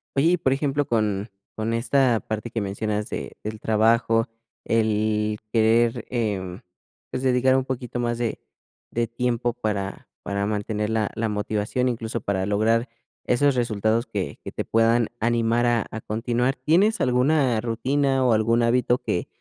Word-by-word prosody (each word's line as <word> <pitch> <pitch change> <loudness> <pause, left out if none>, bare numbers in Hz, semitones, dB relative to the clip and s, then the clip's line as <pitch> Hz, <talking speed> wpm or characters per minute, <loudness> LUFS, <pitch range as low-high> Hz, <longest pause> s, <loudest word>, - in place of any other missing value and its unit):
Oye, 150 +5 +4
y 180 - +3
por 135 -5 +1
ejemplo, 145 +1 0
con 105 -3 0 0.3
con 110 +1 -2
esta 120 0 +2
parte 110 +2 -5
que 115 - -2
mencionas 105 +1 -2
de - - -5
del 110 0 -5
trabajo, 115 +1 +2 0.4
el 110 -1 +1
querer, 115 +1 +3
em, 100 -7 -2 0.5
pues, 130 - -3
dedicar 130 0 +3
un 130 -1 +1
poquito 125 -2 -4
más 120 -1 -1
de 120 -2 -2 0.5
de 120 0 0
tiempo 120 0 -1
para 105 -5 -3 0.2
para 100 0 -2
mantener 105 0 -2
la 110 -2 0
la 115 0 -1
motivación 105 +4 -1
incluso 115 -1 -3
para 95 -2 -1
lograr 115 +3 +1 0.4
esos 140 +3 +3
resultados 115 -1 0
que 105 -4 -4
que - - -6
te - - -4
puedan 115 0 +3
animar 115 +1 +1
a 120 -2 +2
a 110 - -5
continuar. 120 +4 -1
¿Tienes 200 +8 +2
alguna 125 -1 +2
rutina 135 +3 +1
o 120 - +4
algún 115 +2 +2
hábito 120 +1 +2
que - - -1
115 Hz, 155 wpm, -24 LUFS, 110-125 Hz, 0.5 s, Oye